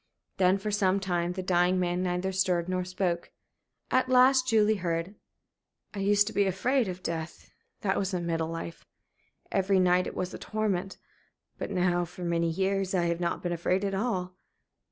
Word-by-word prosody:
Then, 185 Hz, 0 st, +4 dB
for 210 Hz, +2 st, -4 dB
some 195 Hz, -2 st, +2 dB
little 195 Hz, -1 st, -3 dB
time, 175 Hz, 0 st, 0 dB
the 185 Hz, 0 st, -4 dB
dying 180 Hz, 0 st, +2 dB
man 180 Hz, 0 st, 0 dB
neither 180 Hz, +1 st, -1 dB
stirred 185 Hz, -2 st, +1 dB
nor 185 Hz, 0 st, -1 dB
spoke. 180 Hz, -1 st, -2 dB, 0.6 s
At 255 Hz, 0 st, +2 dB
last 255 Hz, 0 st, +5 dB
Julie 220 Hz, -2 st, +3 dB
heard: 170 Hz, 0 st, -2 dB, 0.8 s
"I 205 Hz, -, -5 dB
used 205 Hz, +1 st, +4 dB
to 220 Hz, -, -5 dB
be 200 Hz, -, +3 dB
afraid 240 Hz, +6 st, +1 dB
of 185 Hz, 0 st, -6 dB
death 165 Hz, 0 st, -5 dB, 0.3 s
that 195 Hz, -1 st, 0 dB
was 195 Hz, 0 st, -1 dB
in 180 Hz, -2 st, -2 dB
middle 165 Hz, -1 st, -1 dB
life. 165 Hz, 0 st, -6 dB, 0.7 s
Every 195 Hz, 0 st, +2 dB
night 180 Hz, 0 st, +3 dB
it -, -, -7 dB
was 185 Hz, 0 st, -3 dB
a -, -, -7 dB
torment. 200 Hz, -3 st, -2 dB, 0.6 s
But -, -, -4 dB
now, 180 Hz, -2 st, +1 dB
for 175 Hz, +1 st, -10 dB
many 170 Hz, -1 st, +1 dB
years, 190 Hz, +2 st, 0 dB
I 175 Hz, -, +2 dB
have 170 Hz, 0 st, 0 dB
not 170 Hz, -1 st, -2 dB
been 175 Hz, -1 st, -1 dB
afraid 185 Hz, +3 st, 0 dB
at 195 Hz, -, -2 dB
all.... 190 Hz, -4 st, -2 dB
185 Hz, 185 wpm, -28 LUFS, 175-200 Hz, 0.8 s, last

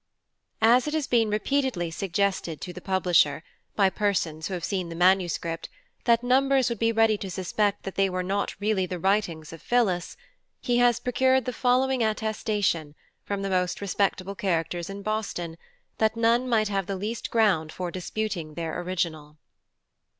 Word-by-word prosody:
AS 240 Hz, +5 st, +5 dB
it 300 Hz, -, -1 dB
has 310 Hz, -3 st, 0 dB
been 230 Hz, -4 st, +2 dB
repeatedly 210 Hz, -5 st, 0 dB
suggested 185 Hz, -2 st, -1 dB
to 180 Hz, -, -7 dB
the -, -, -9 dB
Publisher, 175 Hz, -6 st, +2 dB, 0.3 s
by 195 Hz, -2 st, +3 dB
Persons, 170 Hz, -7 st, -1 dB
who 190 Hz, -, -3 dB
have 175 Hz, -, -6 dB
seen 185 Hz, -2 st, -2 dB
the 165 Hz, -, -6 dB
Manuscript, 175 Hz, -2 st, +1 dB, 0.4 s
that 235 Hz, 0 st, +4 dB
Numbers 265 Hz, 0 st, +3 dB
would 235 Hz, -3 st, -4 dB
be 230 Hz, 0 st, +2 dB
ready 225 Hz, -2 st, +3 dB
to 195 Hz, -, -5 dB
suspect 200 Hz, +2 st, -1 dB
they 195 Hz, 0 st, 0 dB
were 185 Hz, 0 st, -2 dB
not 200 Hz, +2 st, -2 dB
really 205 Hz, -3 st, +1 dB
the 180 Hz, -, -4 dB
Writings 175 Hz, -4 st, 0 dB
of 165 Hz, -, -10 dB
PHILLIS, 200 Hz, -8 st, 0 dB, 0.4 s
he 245 Hz, 0 st, +1 dB
has 245 Hz, -1 st, +4 dB
procured 260 Hz, 0 st, +2 dB
the 250 Hz, -, -2 dB
following 255 Hz, +1 st, +2 dB
Attestation, 210 Hz, -7 st, -1 dB, 0.3 s
from 200 Hz, -1 st, -3 dB
the 195 Hz, -, -2 dB
most 180 Hz, -1 st, 0 dB
respectable 195 Hz, -1 st, -1 dB
Characters 175 Hz, -2 st, -2 dB
in 200 Hz, 0 st, -7 dB
Boston, 200 Hz, -6 st, -3 dB, 0.4 s
that 220 Hz, +1 st, +2 dB
none 235 Hz, +2 st, +2 dB
might 220 Hz, -3 st, +3 dB
have 195 Hz, -2 st, -1 dB
the 195 Hz, -, -2 dB
least 215 Hz, +5 st, -4 dB
Ground 195 Hz, -9 st, +2 dB
for 180 Hz, 0 st, -4 dB
disputing 180 Hz, -4 st, -4 dB
their 165 Hz, 0 st, -3 dB
Original. 160 Hz, -4 st, -3 dB
200 Hz, 165 wpm, -26 LUFS, 175-225 Hz, 0.4 s, AS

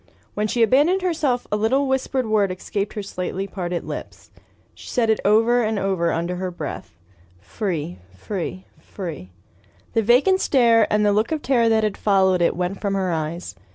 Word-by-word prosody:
When 210 Hz, +1 st, -1 dB
she 235 Hz, +2 st, +1 dB
abandoned 295 Hz, -, +3 dB
herself 305 Hz, -9 st, 0 dB
a -, -, +2 dB
little 255 Hz, +7 st, +1 dB
whispered 265 Hz, -1 st, 0 dB
word 210 Hz, -3 st, +1 dB
escaped 195 Hz, +2 st, -4 dB
her 210 Hz, -, -4 dB
slightly 190 Hz, 0 st, -4 dB
parted 180 Hz, -3 st, -4 dB
lips. -, -, -8 dB, 0.4 s
She -, -, -14 dB
said 230 Hz, -3 st, +2 dB
it 220 Hz, -, +1 dB
over 225 Hz, +4 st, +4 dB
and 220 Hz, -1 st, -1 dB
over 190 Hz, -4 st, 0 dB
under 170 Hz, +2 st, -2 dB
her 185 Hz, 0 st, -3 dB
breath: 95 Hz, -, -7 dB, 0.4 s
"free, 145 Hz, -, -4 dB
free, 185 Hz, -, -5 dB
free!" 165 Hz, -, -8 dB, 0.6 s
The 225 Hz, -, +3 dB
vacant 255 Hz, -, +4 dB
stare 230 Hz, -5 st, +3 dB
and 210 Hz, 0 st, +2 dB
the 205 Hz, -, +3 dB
look 215 Hz, +6 st, +1 dB
of 310 Hz, -2 st, -2 dB
terror 240 Hz, -3 st, +3 dB
that 220 Hz, -1 st, +2 dB
had 210 Hz, -2 st, -1 dB
followed 190 Hz, -3 st, +2 dB
it 170 Hz, -, +2 dB
went 180 Hz, +2 st, -3 dB
from 200 Hz, -1 st, -1 dB
her 190 Hz, -2 st, 0 dB
eyes. 160 Hz, -, -4 dB
205 Hz, 180 wpm, -22 LUFS, 180-235 Hz, 0.6 s, over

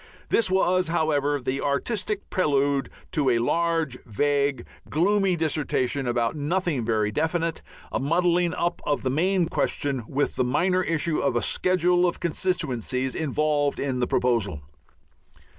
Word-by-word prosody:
This 225 Hz, -4 st, +2 dB
was, 185 Hz, -1 st, +2 dB
however, 145 Hz, -3 st, +1 dB
the 130 Hz, +1 st, -2 dB
artistic 205 Hz, +8 st, -2 dB
prelude 140 Hz, -6 st, +1 dB, 0.2 s
to 150 Hz, -6 st, +1 dB
a 120 Hz, -, +3 dB
large, 165 Hz, +1 st, 0 dB
vague, 140 Hz, +3 st, 0 dB, 0.2 s
gloomy 195 Hz, +3 st, +2 dB
dissertation 145 Hz, -4 st, -1 dB
about 120 Hz, +2 st, 0 dB
nothing 155 Hz, -2 st, -1 dB
very 110 Hz, -2 st, 0 dB
definite, 160 Hz, +4 st, -1 dB, 0.3 s
a -, -, -1 dB
muddling 175 Hz, +3 st, +1 dB
up 175 Hz, 0 st, -1 dB
of 145 Hz, -, -1 dB
the 130 Hz, -, 0 dB
main 180 Hz, +5 st, +2 dB
question 140 Hz, -5 st, -1 dB
with 145 Hz, +2 st, -1 dB
the 130 Hz, -, +2 dB
minor 180 Hz, +9 st, +1 dB
issue 165 Hz, -2 st, 0 dB
of 140 Hz, -, 0 dB
a 120 Hz, -, +2 dB
schedule 180 Hz, 0 st, +2 dB
of 175 Hz, -, -3 dB
constituencies 135 Hz, -, -1 dB
involved 150 Hz, -1 st, 0 dB
in 130 Hz, -2 st, -1 dB
the 125 Hz, -, +1 dB
proposal. 105 Hz, -, 0 dB
150 Hz, 140 wpm, -25 LUFS, 130-175 Hz, 0.3 s, a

